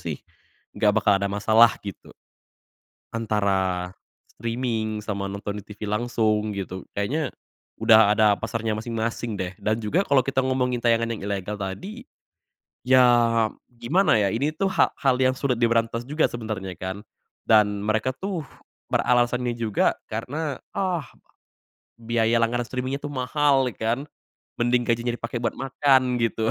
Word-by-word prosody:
sih - - -4 0.6
enggak 105 -1 +2
bakal 105 - +4
ada 100 - 0
masalah 110 +3 +4
gitu. 100 -2 -9 1.0
Antara 95 -5 0 0.4
streaming 115 -2 -2
sama 100 -2 -3
nonton 100 +1 -5
di - - -22
TV 105 +1 -8
langsung 110 -1 0
gitu. 95 -2 -5 0.2
Kayaknya 130 +8 -1 0.5
sudah 110 -2 +6
ada 105 -1 +4
pasarnya 115 0 -3
masing-masing 115 -1 -3
deh 90 0 -3
dan 110 +1 0
juga 115 - +1
kalau 140 -2 +4
kita 135 -1 +1
ngomongin 125 -2 0
tayangan 115 -1 +3
yang 110 - -7
ilegal 100 0 -3
tadi. 185 - -6 0.8
Ya 130 0 +5 0.7
gimana 160 +8 +2
ya, 100 -3 +2
ini 145 +7 -1
tuh 195 +2 0
ha - - +4
hal 130 -3 +1
yang 130 0 +3
sulit 125 -4 -1
diberantas 115 0 +1
juga 150 +2 +1
sebenernya 110 -5 -5
kan. 95 +3 -5 0.4
Dan 105 -2 +3
mereka 110 +4 0
tuh 190 -3 -3 0.5
beralasannya 125 0 +1
juga 115 -3 +1 0.2
karena, 140 +7 -3 0.2
"Ah, 180 -6 -1 0.9
biaya 115 0 0
langganan 120 +1 0
streaming 130 +3 -3
itu 145 - -7
mahal 135 -1 +1
ya - - -18
kan?" 115 +2 0 0.6
Mending 120 +1 +2
gajinya 120 +1 0
dipake 120 0 -4
buat 115 - -1
makan 130 -2 +2
gitu. 115 -1 0
115 Hz, 140 wpm, -24 LUFS, 105-130 Hz, 1.0 s, sudah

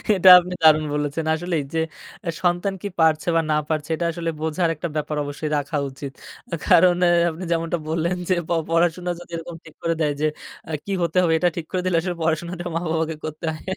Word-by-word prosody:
এটা 185 0 +6
আপনি 180 +1 -5
দারুণ 155 -1 +6
বলেছেন। 150 +2 -2
আসলেই 165 -2 -1
যে 165 - +1 0.5
আ - - +1
সন্তান 175 +3 +1
কী 205 - -3
পারছে 160 0 +3
বা 165 - +4
না - - +3
পারছে, 155 0 -2
এটা 170 - -2
আসলে 165 0 -3
বোঝার 165 +2 0
একটা 170 +3 -4
ব্যাপার 150 0 -2
অবশ্যই 145 +2 -4
রাখা 145 +2 -2
উচিত। 135 0 -7 0.5
কারণ 175 +1 +6 0.3
আপনি 165 +3 -7
যেমনটা 165 +1 0
বললেন 170 +2 0
যে - - +5
প - - -20 0.2
পড়াশোনা 175 +1 +1
যদি 175 - -13
এরকম 165 0 -8
ঠিক 160 - -14
করে 165 0 +1
দেয় 150 -1 +2
আ - - -10
যে 155 - +3 0.6
কী 200 - -5
হতে 170 - -1
হবে, 165 -2 +3
এটা 175 - +3
ঠিক 165 - -3
করে 185 -1 0
দিলে 180 -2 +1
আসলে 180 0 -3
পড়াশোনাটা 170 +2 -2
মা-বাবাকে 160 -1 -1
করতে 155 +1 -6
হয়। 155 - -10
165 Hz, 205 wpm, -22 LUFS, 155-175 Hz, 0.6 s, এটা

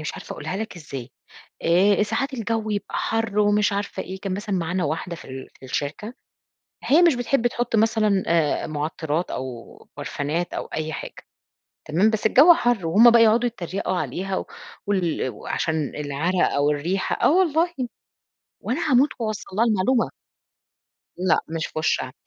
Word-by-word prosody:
مش 150 - -4
عارفة - - -8
أقولها 160 +5 -5
لك 220 -2 -5
إزاي 140 -6 -8 0.5
آآ، 195 +5 +4
ساعات 255 +6 -1
الجو 225 -2 -2
يبقى 205 -1 -3
حَرّ 225 -2 -1
ومش 205 0 +3
عارفة 200 0 -3
إيه، 190 +1 -8
كان 195 -2 -3
مثلًا 205 0 -3
معانا 180 +1 -1
واحدة 165 +3 -3
في - - -12
ال 130 0 -8
في - - -13
الشركة، 150 - -4 0.7
هي 310 +5 +5
مش 340 -5 +5
بتحب 245 0 +1
تحط 240 -1 -2
مثلًا 215 -3 +2
آآ، 165 -3 +1
معطرات 155 +2 -2
أو 125 -3 -7
برفانات 155 +5 -3
أو - - -3
أي 155 0 -4
حاجة 135 - -6 0.7
تمام، 180 +8 +3
بس 220 -1 -2
الجو 285 +10 +8
حَرّ 240 - 0
وهم 220 +8 +7
بقى 235 0 +6
يقعدوا 230 +2 +4
يتريقوا 190 -4 -3
عليها، 190 +2 -3 0.4
وال 180 -9 0
وعشان 155 +2 -3
العرق 150 +5 0
أو 145 +1 +2
الريحة، 170 +7 -1
آه - - +6
والله 345 -1 +2 0.9
وأنا 280 +4 -1
هاموت 260 +4 +5
وأوصل 215 -4 -4
لها 230 - +4
المعلومة. 225 +3 +2 1.1
لأ، 185 -1 +2
مش 160 -1 -3
في - - -6
وشها 130 -5 0
195 Hz, 155 wpm, -23 LUFS, 160-225 Hz, 1.1 s, الجو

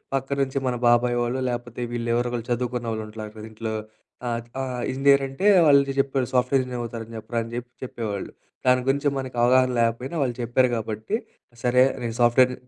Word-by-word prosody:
పక్కనుంచి 135 0 -1
మన 125 - 0
బాబాయ్ 120 0 +4
వాల్లో 120 +2 -1
లేపోతే 120 0 -5
వీళ్ళు 120 0 -2
ఎవరో 120 0 0
ఒకళ్లు 120 -1 -4
చదువుకున్నోళ్ళుంట్లారు 110 -3 -3
గదా! 110 - -8
ఇంట్లో, 110 0 -4 0.5
ఆ! - - 0 0.3
ఆ! - - -1 0.3
ఇంజినీర్ 140 +1 +4
అంటే 185 +10 -1 0.2
వాళ్ళు 140 -1 +7 0.2
జెప్పారు, 135 -2 +1
"సాఫ్ట్‌వేర్ 130 +2 +3
ఇంజినీర్ 125 -1 -5
అవుతారు 115 -1 -5
అని 115 - -10
జెప్పరా" 115 +2 -3
అని 115 - -9
జెప్పి 125 0 -7
చెప్పేవాళ్ళు. 105 -5 -5 0.3
దాని 125 0 +4
గురించి 140 +2 +2
మనకవగాహన 130 0 +2
లేకపోయినా 115 +7 0
వాళ్ళు 125 -3 0
చెప్పారు 120 +2 +3
గాబట్టి, 110 - -3 0.5
సరే 125 +1 +4 0.2
నేను 115 -1 -3
సాఫ్ట్‌వేర్ 125 +2 +5
120 Hz, 165 wpm, -24 LUFS, 115-130 Hz, 0.5 s, వాళ్ళు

